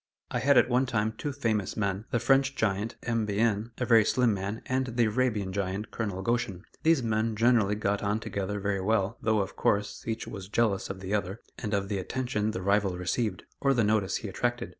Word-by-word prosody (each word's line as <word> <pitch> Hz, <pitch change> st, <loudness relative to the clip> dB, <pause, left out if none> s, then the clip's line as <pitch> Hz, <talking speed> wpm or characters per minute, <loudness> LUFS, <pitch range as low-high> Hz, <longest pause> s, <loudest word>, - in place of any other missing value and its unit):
I -, -, 0 dB
had 140 Hz, 0 st, +4 dB
at 120 Hz, -, +6 dB
one 130 Hz, +1 st, +2 dB
time 110 Hz, -2 st, 0 dB
two 145 Hz, -, -3 dB
famous 110 Hz, -8 st, -1 dB
men, 100 Hz, 0 st, -1 dB
the -, -, +1 dB
French 135 Hz, +3 st, +3 dB
giant, 105 Hz, 0 st, -1 dB
M. 115 Hz, -2 st, 0 dB
Bihin, 105 Hz, +1 st, +1 dB
a 125 Hz, -, -1 dB
very 115 Hz, -2 st, +6 dB
slim 120 Hz, 0 st, +2 dB
man, 100 Hz, +3 st, -4 dB
and 130 Hz, 0 st, 0 dB
the 120 Hz, -1 st, +1 dB
Arabian 110 Hz, -4 st, 0 dB
giant, 100 Hz, +2 st, -3 dB
Colonel 100 Hz, -4 st, -3 dB
Goshen. 115 Hz, -5 st, -1 dB, 0.2 s
These 160 Hz, -5 st, +3 dB
men 110 Hz, 0 st, 0 dB
generally 110 Hz, -2 st, +3 dB
got 105 Hz, -1 st, -1 dB
on 105 Hz, +1 st, 0 dB
together 100 Hz, -1 st, -3 dB
very 100 Hz, -1 st, -1 dB
well, 105 Hz, +1 st, 0 dB
though, 110 Hz, -2 st, +2 dB
of 95 Hz, -, -5 dB
course, 105 Hz, 0 st, 0 dB
each 110 Hz, 0 st, -2 dB
was 100 Hz, -3 st, -7 dB
jealous 105 Hz, -3 st, +1 dB
of 95 Hz, -1 st, -6 dB
the 95 Hz, +2 st, -4 dB
other, 100 Hz, +1 st, -1 dB, 0.2 s
and 105 Hz, -, -4 dB
of 100 Hz, -1 st, -1 dB
the 100 Hz, -1 st, -2 dB
attention 110 Hz, +1 st, -2 dB
the 95 Hz, -4 st, -4 dB
rival 100 Hz, -2 st, +2 dB
received, 90 Hz, +2 st, -1 dB, 0.2 s
or 135 Hz, -1 st, +2 dB
the 120 Hz, -, +3 dB
notice 105 Hz, -2 st, +1 dB
he 110 Hz, -, -6 dB
attracted. 120 Hz, +5 st, -2 dB
105 Hz, 210 wpm, -28 LUFS, 100-120 Hz, 0.2 s, at